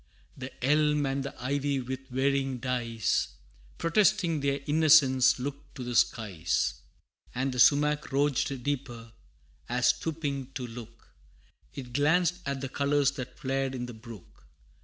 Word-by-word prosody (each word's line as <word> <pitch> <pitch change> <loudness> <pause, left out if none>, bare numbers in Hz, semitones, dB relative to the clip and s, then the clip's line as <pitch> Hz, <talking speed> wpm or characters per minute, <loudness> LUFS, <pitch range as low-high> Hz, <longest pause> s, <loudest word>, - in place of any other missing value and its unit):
The 130 0 -7
elm 150 0 +3
and 135 0 -1
the 140 - -8
ivy 140 +1 0
with 130 +1 -6
varying 135 0 0
dyes, 115 - -1 0.4
Protesting 180 -2 +2
their 140 0 0
innocence, 145 -4 +5
looked 140 +2 -7
to 130 - -6
the 120 0 -4
skies: 95 -9 +1 0.6
And 130 +2 -1
the 125 - -4
sumach 150 +3 +4
rouged 135 -2 0
deeper, 125 -5 -4 0.6
as 125 +1 +2
stooping 140 -5 -2
to 125 - -4
look, 115 -1 -11 0.7
It 125 -2 -8
glanced 170 +6 +2
at 140 -1 -3
the 135 - -4
colors 140 0 +1
that 130 -2 -8
flared 135 -1 -2
in 125 -1 -4
the 120 - -8
brook. 110 - -13
135 Hz, 135 wpm, -28 LUFS, 125-145 Hz, 0.7 s, innocence